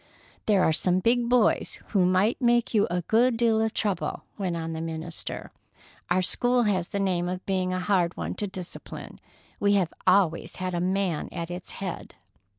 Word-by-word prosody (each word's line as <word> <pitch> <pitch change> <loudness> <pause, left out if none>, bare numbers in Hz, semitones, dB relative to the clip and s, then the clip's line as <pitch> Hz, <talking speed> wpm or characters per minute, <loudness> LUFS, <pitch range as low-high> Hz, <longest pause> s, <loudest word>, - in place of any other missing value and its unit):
"There 200 -4 +4
are 160 - +3
some 180 +3 +2
big 235 +4 +2
boys 245 -3 +2
who 190 -4 +3
might 190 +8 +2
make 240 -1 +2
you 210 -2 +3
a 175 0 -1
good 230 +5 +3
deal 225 -2 +3
of 220 0 +1
trouble," 200 -6 -2
went 185 -4 -2
on 165 0 -4
the 160 - -4
minister. 165 0 -5 0.6
"Our 185 +1 +2
school 245 +6 +3
has 190 -5 +1
the 200 - -3
name 180 -3 0
of 180 0 -5
being 185 -1 0
a 185 - -1
hard 180 -2 +1
one - - -3
to 205 - 0
discipline. 185 -2 -8 0.4
We 205 0 +3
have 185 -5 +1
always 185 -3 +3
had 185 -1 -3
a 175 - -1
man 185 -3 0
at 170 -1 -5
its 175 0 -6
head." 190 -3 -6
185 Hz, 185 wpm, -26 LUFS, 175-210 Hz, 0.6 s, There